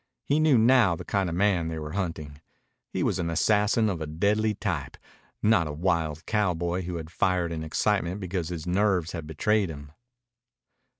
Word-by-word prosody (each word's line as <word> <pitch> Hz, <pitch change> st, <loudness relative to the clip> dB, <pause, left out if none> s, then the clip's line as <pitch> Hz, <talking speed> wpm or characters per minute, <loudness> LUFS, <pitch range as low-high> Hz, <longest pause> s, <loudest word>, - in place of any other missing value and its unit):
He 145 Hz, +2 st, +2 dB
knew 155 Hz, -5 st, +4 dB
now 115 Hz, -5 st, +5 dB
the -, -, -9 dB
kind 95 Hz, -3 st, 0 dB
of 85 Hz, -, -3 dB
man 90 Hz, -3 st, +2 dB
they 80 Hz, 0 st, -4 dB
were 75 Hz, -1 st, -6 dB
hunting. 80 Hz, -6 st, -4 dB, 0.5 s
He -, -, -1 dB
was -, -, 0 dB
an 85 Hz, -1 st, -1 dB
assassin 105 Hz, +6 st, +2 dB
of 90 Hz, -6 st, -2 dB
a 80 Hz, -, -3 dB
deadly 105 Hz, +7 st, +1 dB
type, 85 Hz, -11 st, -3 dB, 0.5 s
not 100 Hz, -7 st, +3 dB
a -, -, -4 dB
wild 80 Hz, -1 st, -1 dB
cowboy 90 Hz, -4 st, 0 dB
who 90 Hz, 0 st, -5 dB
had 80 Hz, -1 st, -6 dB
fired 90 Hz, -2 st, 0 dB
in 80 Hz, -1 st, -4 dB
excitement 90 Hz, +3 st, 0 dB
because 90 Hz, -3 st, -3 dB
his 85 Hz, -3 st, -5 dB
nerves 90 Hz, -2 st, +1 dB
had 80 Hz, -4 st, -6 dB
betrayed 100 Hz, +5 st, +1 dB
him. 75 Hz, -2 st, -9 dB
90 Hz, 180 wpm, -27 LUFS, 80-105 Hz, 0.5 s, now